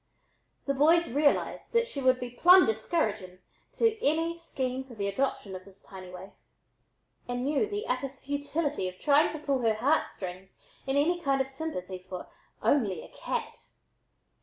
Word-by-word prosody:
The 275 - +1
boys 320 +3 +4
realized 290 - +1
that 465 0 +3
she 285 - -5
would 255 -1 +4
be 245 -1 -5
"plumb 360 +9 +7
discouraging" 215 - -1 0.4
to 450 -1 +1
any 325 +3 +1
scheme 265 -6 -3
for 260 -3 -13
the 200 -2 -2
adoption 200 -3 -2
of 185 - -8
this 195 0 -17
tiny 185 -1 -10
waif, 180 +2 -10 1.0
and 245 +1 -2
knew 295 +8 +1
the 415 +1 -4
utter 255 +2 -1
futility 285 - -2
of 185 - -13
trying 290 +5 +4
to 310 - -5
pull 285 -3 -1
her 225 -3 +2
heartstrings 195 - -2 0.3
in 270 +1 +1
any 345 +5 +2
kind 275 -3 +1
of 265 - +1
sympathy 230 - -5
for 180 -1 -6 0.4
"only 205 - +2
a - - -13
cat." - - -5
270 Hz, 160 wpm, -29 LUFS, 205-310 Hz, 1.0 s, plumb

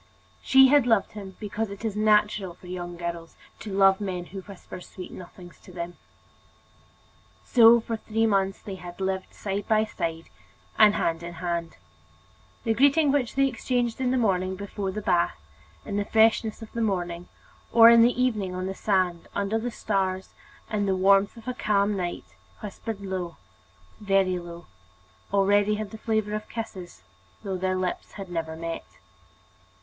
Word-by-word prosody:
She 265 0 +6
had 285 -3 +5
loved 225 -4 +2
him 195 -3 -9
because 210 +1 -3
it 200 +3 -8
is 215 -2 -2
natural 210 -3 +2
for 180 - -18
young 175 -1 -6
girls 170 -1 -5 0.2
to 210 - -7
love 195 0 +4
men 185 -3 -3
who 195 +2 -8
whisper 185 -1 -11
sweet 180 0 -10
nothings 175 -1 -12
to - - -15
them. 175 0 -6 1.5
So, 235 -1 +7
for 225 0 -4
three 225 +1 0
months, 195 -2 +1
they 205 - -6
had 175 0 -9
lived 190 0 -2
side 200 0 -4
by 215 0 +3
side, 165 -5 -4 0.5
and 210 -1 +6
hand 165 0 0
in 170 0 -7
hand. 170 -1 -4 0.9
The 225 - +1
greeting 285 +4 +4
which 270 -5 0
they 275 0 +4
exchanged 245 -1 -1
in 255 - +1
the 260 - +1
morning 190 -5 +1
before 200 0 -4
the 210 +2 -5
bath, 175 -3 +1 0.5
in 200 -1 -3
the 205 - 0
freshness 225 0 +2
of 220 - -11
the 235 - -3
morning, 175 -4 -2 0.4
or 230 0 +9
in 235 0 +7
the 245 +2 +3
evening 210 -8 0
on 185 0 -3
the 190 - -3
sand, 185 -4 0
under 200 +2 0
the 240 +2 -3
stars, 190 -4 -2 0.4
in 205 -2 0
the 190 - +2
warmth 195 +3 +3
of 230 - -13
a 250 - -1
calm 205 -3 +1
night, 175 -2 -4 0.4
whispered 210 0 -6
low, 185 -3 -4 0.6
very 195 -3 +2
low, 175 0 -10 0.7
already 205 +1 +3
had 215 -1 -5
the 220 - -8
flavor 220 -2 -1
of 215 0 -4
kisses, 190 -6 -7 0.4
though 195 -2 -3
their 185 0 -1
lips 185 -1 -3
had 195 -3 -8
never 160 -2 -3
met. 165 0 -6
200 Hz, 170 wpm, -26 LUFS, 180-220 Hz, 1.5 s, or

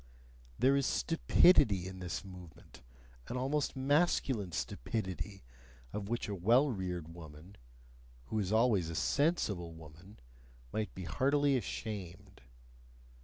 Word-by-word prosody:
There 135 +2 +4
is 140 -1 +2
STUPIDITY 115 - +4
in 95 0 -8
this 90 +2 -4
movement, 90 -3 -13 0.5
an 125 - -4
almost 140 +3 -1
masculine 135 - +1
stupidity, 100 +1 -4 0.5
of 105 -1 -4
which 120 0 -2
a 105 - -3
well 120 +10 +3
reared 90 -6 -4
woman 80 +3 -12 0.7
who 110 - -2
is 100 -2 -1
always 110 -7 +3
a 85 - -5
sensible 100 - 0
woman 80 +6 -14 0.5
might 110 -3 -3
be 95 - -6
heartily 140 - +2
ashamed. 100 - -5
100 Hz, 120 wpm, -33 LUFS, 90-130 Hz, 0.7 s, There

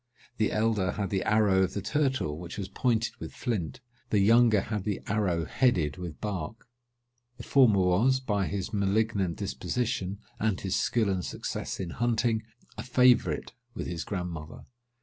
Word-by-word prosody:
The 110 - +1
elder 105 -4 +1
had 100 -2 -3
the 95 -2 +1
arrow 105 -3 +3
of 95 - 0
the 100 - -1
turtle 120 - 0
which 85 0 -8
was 100 -2 -3
pointed 115 -1 0
with - - -8
flint; 110 - -3 0.3
the 105 - +2
younger 110 +1 +5
had 105 -2 -3
the 100 -1 -2
arrow 95 -6 0
headed 85 - +1
with 90 -4 -7
bark. 100 0 -5 0.7
The 120 - -8
former 115 -9 +5
was, 105 +9 +3
by 105 -7 -1
his 95 +6 -4
malignant 100 -2 +1
disposition, 110 -6 -2 0.2
and 110 -3 0
his 95 -1 -2
skill 115 -3 +1
and 95 -2 -1
success - - -4
in 90 -3 -4
hunting, 115 0 +1 0.4
a - - -1
favourite 125 -1 +3 0.2
with - - -4
his 85 -2 -4
grandmother. 90 -5 -5
105 Hz, 160 wpm, -28 LUFS, 90-115 Hz, 0.7 s, younger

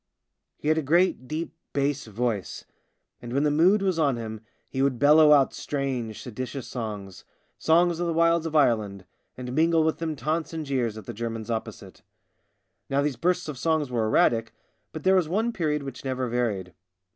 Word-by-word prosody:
He 150 - -2
had 155 +1 +3
a - - 0
great 160 -3 +2
deep 160 +3 -4 0.2
bass 140 -2 -1
voice, 110 -2 -3 0.6
and 120 - -8
when 140 +2 +2
the 150 - +2
mood 185 +7 +4
was 185 -4 0
on 140 -5 +2
him 110 -2 -6 0.3
he 130 - -3
would 135 -2 +1
bellow 150 +3 +6
out 140 -2 +5
strange 130 -6 -3
seditious 130 +2 -6
songs 105 -6 -6 0.2
— - - -44
songs 170 +1 +4
of 175 - -1
the 165 - 0
wilds 165 0 +3
of 160 - -6
Ireland 105 -9 +2 0.2
— - - -48
and 125 -1 -6
mingle 165 +2 +3
with 160 0 0
them 160 -2 -2
taunts 155 +3 -2
and 160 -1 -4
jeers 125 -6 -1
at 110 - -9
the - - -6
Germans 115 0 -4
opposite. 110 -1 -6 0.9
Now 140 +1 +1
these 145 -2 -1
bursts 180 +8 0
of 145 -5 -6
song 160 -3 +1
were 115 -3 0
erratic, 115 +1 +2 0.4
but 155 - -7
there 190 - +4
was 180 -5 +2
one 220 +6 0
period 150 -6 -1
which 135 -2 -8
never 130 -1 -2
varied. 110 -7 -2
140 Hz, 190 wpm, -26 LUFS, 120-160 Hz, 0.9 s, bellow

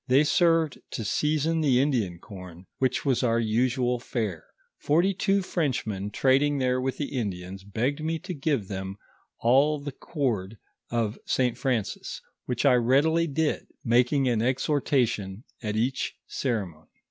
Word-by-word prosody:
They 135 +3 +5
served 165 -1 +3
to 115 - -3
season 155 +7 +1
the 135 -5 +4
Indian 120 -11 +1
corn, 90 -2 -11
which 130 -1 +1
Avas 130 -4 +1
our 115 -2 +2
usual 125 +2 +1
faro. 110 -8 -3 0.4
Forty 175 +7 +2
two 195 +1 +1
Frenchmen 115 - -2
trading 135 +6 +3
there 130 -1 +1
with 130 0 -2
the 145 -2 -4
Indians 95 -4 -4
begged 125 +9 -2
me 165 +1 0
to 180 - -6
give 140 - -1
them 95 0 -5 0.4
all 140 +6 +4
the 145 0 -5
cord 115 - -2 0.3
of 115 -2 -1
St. 125 -2 +1
Francis, 125 -5 -2 0.3
which 125 +2 -1
I 135 - +6
readily 140 +8 +3
did, 155 +1 -1 0.2
making 125 +3 +3
an 115 -3 +2
exhortation 125 -6 0 0.2
at 105 -2 -2
each 125 +4 -1
ceremony. 100 - -3
125 Hz, 145 wpm, -27 LUFS, 110-145 Hz, 0.4 s, I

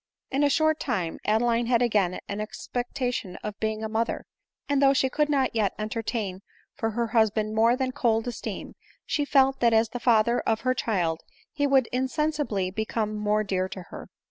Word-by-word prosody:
In 275 +2 +1
a 290 - +4
short 315 +2 +2
time 185 - -2
Adeline 230 +2 +2
had 240 0 +3
again 205 -6 +1
an 200 +1 -3
expectation 245 -2 -3
of 210 0 -5
being 220 0 -2
a - - -1
mother; 225 +1 -2 0.4
and 285 -1 +1
though 275 0 +6
she 260 0 +2
could 300 +2 +1
not 270 -3 +1
yet 210 -3 +1
entertain 215 -3 -3 0.3
for 225 - -2
her 235 -1 0
husband 215 -2 +2
more 225 +2 +4
than 260 0 -1
cold 225 -2 +1
esteem, 245 - -5 0.3
she 290 - 0
felt 270 -1 +3
that 235 -1 +4
as 225 0 +3
the 245 - -5
father 235 0 +3
of 220 -1 0
her 255 0 +2
child 175 -10 -1 0.3
he 285 -2 0
would 270 -2 +4
insensibly 260 - -1
become 220 +1 -2
more 210 0 +1
dear 190 -2 -1
to 190 -2 -7
her. - - -9
230 Hz, 185 wpm, -26 LUFS, 215-260 Hz, 0.4 s, though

